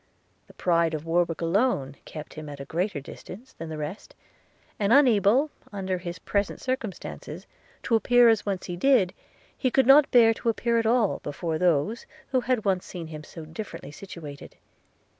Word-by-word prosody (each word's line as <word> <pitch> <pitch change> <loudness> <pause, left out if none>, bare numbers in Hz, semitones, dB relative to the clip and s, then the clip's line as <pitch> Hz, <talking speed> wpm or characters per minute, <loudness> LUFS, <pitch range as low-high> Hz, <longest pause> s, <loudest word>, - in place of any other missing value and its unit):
The - - -18
pride 170 -2 +2
of 155 +1 -6
Warwick 170 0 0
alone 165 - +1
kept 155 -1 -9
him 155 -1 -8
at 145 -1 -8
a 140 - -6
greater 175 +3 -2
distance 195 - -11
than 165 0 -8
the 155 - -5
rest; 150 +7 -7 0.6
and 205 0 +1
unable, 255 +1 +5 0.2
under 190 -3 -3
his 175 -1 -6
present 200 +4 -2
circumstances, 255 -7 -5 0.4
to - - -2
appear 245 +2 +5
as 225 -2 +5
he - - -4
once 190 -2 -3
did, 185 +1 +2 0.4
he 255 - 0
could 265 +1 +3
not 275 +3 +7
bear 230 -3 +6
to 230 - -2
appear 235 +1 +1
at 225 - 0
all 230 -3 +2
before 155 +2 -3
those, 180 +5 +1 0.2
who 260 - +2
had 245 -3 0
once 190 -2 +1
seen 175 -3 -7
him 155 -1 -8
so 160 0 -10
differently 160 -3 -8
situated. 150 -4 -10
190 Hz, 175 wpm, -26 LUFS, 165-230 Hz, 0.6 s, not